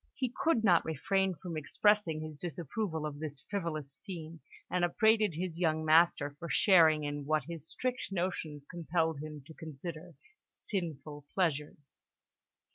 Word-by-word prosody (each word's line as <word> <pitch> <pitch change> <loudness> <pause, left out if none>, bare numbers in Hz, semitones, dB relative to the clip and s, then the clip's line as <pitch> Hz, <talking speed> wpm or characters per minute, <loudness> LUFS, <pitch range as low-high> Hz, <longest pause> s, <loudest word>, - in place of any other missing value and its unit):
He 255 -3 -2
could 285 -9 +3
not 175 -5 +5
refrain 190 +5 0
from 170 0 -6
expressing 165 +2 +2
his 155 -1 -6
disapproval 165 - -3
of 145 -1 -5
this 150 -3 -4
frivolous 155 -8 -3
scene, 165 -3 -8 0.3
and 180 -1 0
upbraided 215 +1 +3
his 170 0 -3
young 160 -2 +1
master 155 -2 +5
for 170 - -6
sharing 160 -6 +5
in 145 0 -3
what 155 -1 +2
his 165 0 -7
strict 250 -4 -3
notions 170 -6 -2
compelled 165 -2 -1
him 150 -1 -7
to 160 - -11
consider 160 +2 -8 0.3
sinful 150 - -4
pleasures. 150 -5 -2
160 Hz, 140 wpm, -32 LUFS, 150-180 Hz, 0.3 s, not